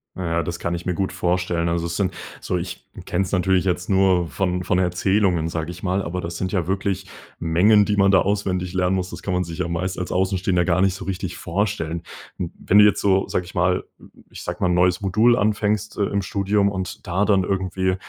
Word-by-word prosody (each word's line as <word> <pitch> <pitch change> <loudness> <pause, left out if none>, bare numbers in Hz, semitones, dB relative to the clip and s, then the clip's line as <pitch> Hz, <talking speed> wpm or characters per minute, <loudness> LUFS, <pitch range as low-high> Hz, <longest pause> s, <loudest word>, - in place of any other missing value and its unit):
Na 95 - -4
ja, 85 - +1
das 85 0 -4
kann 85 0 -2
ich 85 - -7
mir 90 - 0
gut 95 +1 -2
vorstellen. 85 -1 0
Also, 85 0 -1
es 85 0 -3
sind 95 -1 0 0.3
so 90 - -1
ich 90 +1 -6 0.2
kenne 95 - 0
es 95 - -6
natürlich 95 -1 +2
jetzt 90 -1 -1
nur 95 -3 +3
von 90 +4 -1
von 90 - +1
Erzählungen, 90 -1 +1
sage 80 0 -3
ich 90 +2 -11
mal. 95 +1 0
Aber 90 +2 -4
das 85 -1 -5
sind 95 0 -2
ja 90 -5 -1
wirklich 95 0 -2 0.3
Mengen, 100 +6 +4
die 105 - 0
man 100 -1 +4
da 95 - +6
auswendig 95 -3 -1
lernen 90 0 +1
muss, 95 0 -3
das - - -8
kann 95 - -3
man 90 0 0
sich 85 +2 -8
ja 85 - -1
meist 90 +3 -2
als 90 - -4
Außenstehender 95 -1 +1
gar 90 +1 +2
nicht 95 -2 +2
so 95 - -8
richtig 95 -2 -4
vorstellen. 85 -3 -2 0.3
Hm, 85 -2 -4
wenn 100 - +3
du 105 - +9
jetzt 105 - +4
so, 95 -1 +2
sage 90 - -1
ich 95 - -13
mal 90 +1 +1 0.4
ich - - -10
sage - - -4
mal, - - +3
'n - - +2
neues 90 0 +3
Modul 110 +5 +3
anfängst, 105 0 0
äh, 105 - +1
im 100 0 0
Studium 100 +2 +1
und 95 0 -5
da 95 +3 +1
dann 100 -3 +3
irgendwie 95 -1 -1
90 Hz, 235 wpm, -22 LUFS, 90-95 Hz, 0.4 s, du